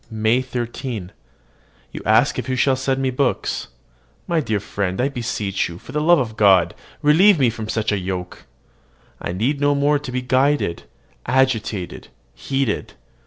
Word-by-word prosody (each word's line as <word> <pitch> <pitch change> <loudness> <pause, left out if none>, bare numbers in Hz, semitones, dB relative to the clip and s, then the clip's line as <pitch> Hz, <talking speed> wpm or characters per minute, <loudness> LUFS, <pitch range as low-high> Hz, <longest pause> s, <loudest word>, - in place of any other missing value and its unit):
MAY 110 +2 +1
13. 120 -5 -5 0.8
You - - -7
ask - - +3
if - - -5
you 130 - 0
shall 130 +1 +3
send 135 +1 -1
me 130 - +1
books. 130 +1 -1 0.6
My 170 -1 +1
dear 110 -8 -1
friend, 95 -2 -3
I 130 +3 +2
beseech 110 -8 -2
you, 85 - -8
for - - -12
the 150 - -1
love 170 +3 +5
of 115 -6 -2
God, 100 -3 +4 0.3
relieve 175 +7 +6
me 130 -5 +3
from 110 -2 -6
such 110 -1 0
a 105 - 0
yoke! 90 -1 -5 0.7
I - - -3
need 125 +11 -1
no 145 0 +3
more 145 +1 +2
to 135 - -7
be 125 0 -2
guided, 130 -7 +1 0.4
agitated, 115 -7 0 0.3
heated. 135 - -2
125 Hz, 165 wpm, -21 LUFS, 105-140 Hz, 0.8 s, relieve